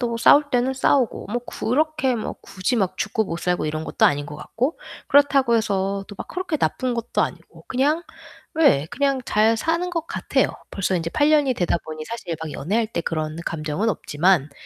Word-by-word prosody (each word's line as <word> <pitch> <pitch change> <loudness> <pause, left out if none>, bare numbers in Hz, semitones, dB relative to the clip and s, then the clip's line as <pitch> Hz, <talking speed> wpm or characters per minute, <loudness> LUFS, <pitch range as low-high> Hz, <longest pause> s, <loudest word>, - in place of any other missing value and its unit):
또 235 -2 -1
싸울 290 +5 +6
때는 250 +1 +2
싸우고. 260 -1 +1
뭐 240 +2 -1
그렇게 275 0 0
뭐 220 - -4
굳이 185 +6 -2
막 190 -4 0
죽고 220 - 0
못 170 -4 -4
살고 180 -2 0
이런 155 +1 -3
것도 - - +3
아닌 145 0 0
것 145 - -8
같고. 260 - -2 0.3
그렇다고 275 -4 +4
해서 195 -2 -1
또 205 - -9
막 - - -6
그렇게 360 -3 -2
나쁜 255 -3 0
것도 235 -1 -2
아니고. - - -7
그냥 290 +6 +1 0.6
예, 150 - +5
그냥 275 -1 0
잘 220 +1 +3
사는 335 +8 0
것 330 -2 -3
같아요. - - 0 0.2
벌써 190 -1 0
인제 165 -1 -2
8 290 - +3
년이 290 -4 +4
되다 175 -5 +1
보니 155 0 -6
사실 200 -5 -5
막 160 - -4
연애할 215 +10 0
때 190 - -2
그런 155 -1 -3
감정은 160 +6 -1
없지만 160 -4 +1
225 Hz, 350 characters per minute, -23 LUFS, 170-270 Hz, 0.6 s, 싸울